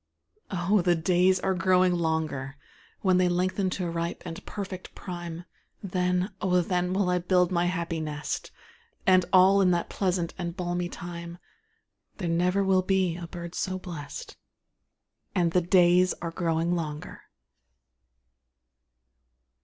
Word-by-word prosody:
Oh, 190 Hz, +2 st, +2 dB
the 175 Hz, 0 st, +3 dB
days 180 Hz, +3 st, +3 dB
are 190 Hz, -, +1 dB
growing 185 Hz, 0 st, +3 dB
longer; 160 Hz, -5 st, -2 dB, 0.4 s
When 185 Hz, -2 st, +3 dB
they 180 Hz, -1 st, +3 dB
lengthen 185 Hz, +2 st, 0 dB
to 180 Hz, -2 st, -2 dB
ripe 170 Hz, +1 st, -3 dB
and 165 Hz, -2 st, -7 dB
perfect 190 Hz, -3 st, -6 dB
prime, 175 Hz, -2 st, -7 dB, 0.4 s
Then, 180 Hz, 0 st, 0 dB
oh, 180 Hz, -2 st, +3 dB
then, 180 Hz, 0 st, 0 dB
I -, -, -3 dB
will 180 Hz, -2 st, +2 dB
build 180 Hz, 0 st, +2 dB
my 175 Hz, -1 st, +2 dB
happy 170 Hz, -2 st, -2 dB
nest; 150 Hz, -1 st, -4 dB, 0.6 s
And 185 Hz, -1 st, +5 dB
all 190 Hz, +1 st, +6 dB
in 185 Hz, -, +4 dB
that 175 Hz, -1 st, 0 dB
pleasant 180 Hz, -3 st, -1 dB
and 170 Hz, 0 st, -4 dB
balmy 175 Hz, -1 st, -2 dB
time, 170 Hz, 0 st, -7 dB, 0.8 s
There 180 Hz, -, -3 dB
never 180 Hz, +4 st, +2 dB
will 190 Hz, -1 st, +3 dB
be 185 Hz, -2 st, +1 dB
a 170 Hz, -1 st, -7 dB
bird 170 Hz, 0 st, -8 dB
so 185 Hz, 0 st, -2 dB
blest; 165 Hz, -6 st, -8 dB, 1.0 s
And 175 Hz, -2 st, +2 dB
the 180 Hz, -, +3 dB
days 180 Hz, 0 st, +4 dB
are 170 Hz, -1 st, -5 dB
growing 165 Hz, 0 st, 0 dB
longer. 150 Hz, -3 st, -5 dB
180 Hz, 140 wpm, -27 LUFS, 170-185 Hz, 1.0 s, all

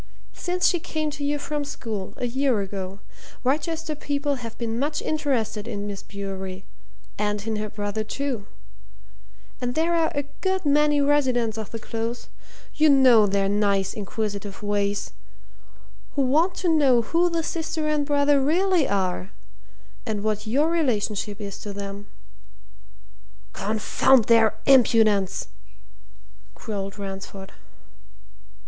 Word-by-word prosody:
Since 360 Hz, 0 st, -1 dB
she 350 Hz, -, +4 dB
came 310 Hz, -1 st, -3 dB
to 285 Hz, -, -6 dB
you 290 Hz, +1 st, +1 dB
from 295 Hz, 0 st, -3 dB
school, 220 Hz, -8 st, -5 dB
a -, -, -2 dB
year 255 Hz, -1 st, +1 dB
ago, 195 Hz, 0 st, -5 dB, 0.4 s
Wrychester 315 Hz, +4 st, -1 dB
people 285 Hz, -2 st, -2 dB
have 230 Hz, -1 st, -7 dB
been 230 Hz, -1 st, -2 dB
much 295 Hz, +2 st, -1 dB
interested 250 Hz, -8 st, -1 dB
in 205 Hz, -3 st, -4 dB
Miss 200 Hz, -1 st, -5 dB
Bewery, 190 Hz, -1 st, -6 dB, 0.5 s
and 210 Hz, 0 st, -1 dB
in 220 Hz, -1 st, -1 dB
her 215 Hz, 0 st, -3 dB
brother, 205 Hz, 0 st, -3 dB
too. 235 Hz, -2 st, -3 dB, 1.1 s
And 245 Hz, 0 st, -2 dB
there 330 Hz, +2 st, +2 dB
are 330 Hz, -1 st, +2 dB
a 285 Hz, -, 0 dB, 0.2 s
good 380 Hz, -2 st, 0 dB
many 295 Hz, 0 st, +4 dB
residents 255 Hz, -6 st, +2 dB
of 220 Hz, -2 st, -5 dB
the 230 Hz, -, -5 dB
Close 230 Hz, +1 st, -4 dB, 0.4 s
you 310 Hz, 0 st, +4 dB
know 255 Hz, -6 st, +6 dB
their 195 Hz, 0 st, +1 dB
nice, 200 Hz, -1 st, +1 dB
inquisitive 205 Hz, 0 st, -4 dB
ways! 205 Hz, 0 st, -1 dB, 1.0 s
who 280 Hz, -, +2 dB
want 315 Hz, +8 st, +2 dB
to 365 Hz, -, -2 dB
know 280 Hz, -7 st, +4 dB
who 340 Hz, +8 st, +2 dB
the 335 Hz, -1 st, -1 dB
sister 320 Hz, -1 st, -2 dB
and 300 Hz, -1 st, +1 dB
brother 285 Hz, -1 st, +3 dB
really 345 Hz, +2 st, +3 dB
are 185 Hz, -1 st, -1 dB, 0.7 s
and 215 Hz, -3 st, -3 dB
what 215 Hz, 0 st, -1 dB
your 290 Hz, +8 st, +2 dB
relationship 215 Hz, -, 0 dB
is 200 Hz, -2 st, -6 dB
to 205 Hz, -, -6 dB
them!" 200 Hz, 0 st, -6 dB, 1.5 s
"Confound 220 Hz, +4 st, +3 dB
their 225 Hz, -2 st, +5 dB
impudence!" 220 Hz, -7 st, +4 dB, 1.1 s
growled 200 Hz, -2 st, -5 dB
Ransford. 195 Hz, -1 st, -7 dB
230 Hz, 130 wpm, -24 LUFS, 205-290 Hz, 1.5 s, know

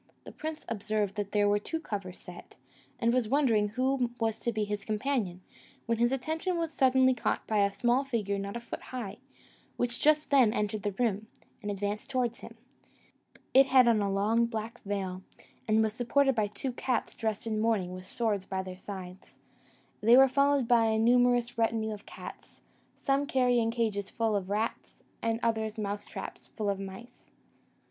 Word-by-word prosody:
The -, -, -10 dB
prince 315 Hz, +1 st, -6 dB
observed 210 Hz, -2 st, -1 dB
there 205 Hz, 0 st, 0 dB
were 205 Hz, 0 st, +3 dB
two 325 Hz, +10 st, -4 dB
covers 195 Hz, -, -5 dB
set, 180 Hz, -2 st, -12 dB, 0.4 s
and 235 Hz, 0 st, +2 dB
was 245 Hz, -4 st, +1 dB
wondering 235 Hz, -7 st, +3 dB
who 255 Hz, +3 st, 0 dB
was 225 Hz, -1 st, 0 dB
to 235 Hz, -, -1 dB
be 215 Hz, -1 st, -1 dB
his 205 Hz, -1 st, -3 dB
companion, 215 Hz, -5 st, -1 dB, 0.4 s
when 230 Hz, -1 st, 0 dB
his 240 Hz, +1 st, +3 dB
attention 320 Hz, +7 st, -1 dB
was 330 Hz, -1 st, -2 dB
suddenly 260 Hz, -1 st, +4 dB
caught 245 Hz, -, -1 dB
by 215 Hz, -1 st, +1 dB
a 200 Hz, 0 st, +3 dB
small 240 Hz, +6 st, +2 dB
figure 210 Hz, -7 st, -1 dB
not 200 Hz, +1 st, -5 dB
a -, -, -7 dB
foot 235 Hz, -, -7 dB
high, 245 Hz, -6 st, -6 dB, 0.6 s
which 245 Hz, 0 st, -2 dB
just 305 Hz, 0 st, +3 dB
then 255 Hz, -6 st, +5 dB
entered 210 Hz, -2 st, -1 dB
the 205 Hz, -1 st, -2 dB
room, 220 Hz, -1 st, -1 dB, 0.3 s
and 205 Hz, -, -4 dB
advanced 205 Hz, +4 st, -3 dB
towards 250 Hz, -3 st, -1 dB
him. -, -, -11 dB, 1.0 s
It 270 Hz, +1 st, +7 dB
had 255 Hz, -2 st, +6 dB
on 225 Hz, -3 st, +4 dB
a 200 Hz, -1 st, 0 dB
long 220 Hz, +4 st, +2 dB
black 225 Hz, +1 st, -5 dB
veil, 190 Hz, -2 st, -3 dB, 0.5 s
and 220 Hz, 0 st, +4 dB
was 215 Hz, -1 st, 0 dB
supported 270 Hz, +4 st, +2 dB
by 215 Hz, -3 st, +1 dB
two 210 Hz, +6 st, -4 dB
cats 245 Hz, -1 st, -2 dB
dressed 220 Hz, -2 st, -2 dB
in 220 Hz, -1 st, -1 dB
mourning 220 Hz, -5 st, +1 dB
and 180 Hz, -, -6 dB
with 185 Hz, 0 st, -11 dB
swords 210 Hz, -5 st, -1 dB
by 190 Hz, -1 st, -2 dB
their 185 Hz, -1 st, -8 dB
sides: 185 Hz, -1 st, -9 dB, 0.6 s
they 230 Hz, +4 st, +7 dB
were 270 Hz, 0 st, +8 dB
followed 280 Hz, -1 st, +2 dB
by 235 Hz, -1 st, +5 dB
a 220 Hz, 0 st, +2 dB
numerous 245 Hz, +1 st, +3 dB
retinue 225 Hz, -1 st, +1 dB
of 205 Hz, -, -11 dB
cats, -, -, -11 dB, 0.4 s
some 280 Hz, 0 st, 0 dB
carrying 245 Hz, -4 st, +2 dB
cages 220 Hz, -4 st, -1 dB
full 225 Hz, -2 st, 0 dB
of 195 Hz, -2 st, -2 dB
rats, 215 Hz, +3 st, -3 dB, 0.2 s
and 225 Hz, 0 st, 0 dB
others 220 Hz, -1 st, 0 dB
mouse 205 Hz, -1 st, -3 dB
traps -, -, -8 dB
full 210 Hz, -3 st, 0 dB
of 195 Hz, -, -4 dB
mice. 195 Hz, +5 st, -10 dB
225 Hz, 185 wpm, -30 LUFS, 205-245 Hz, 1.0 s, were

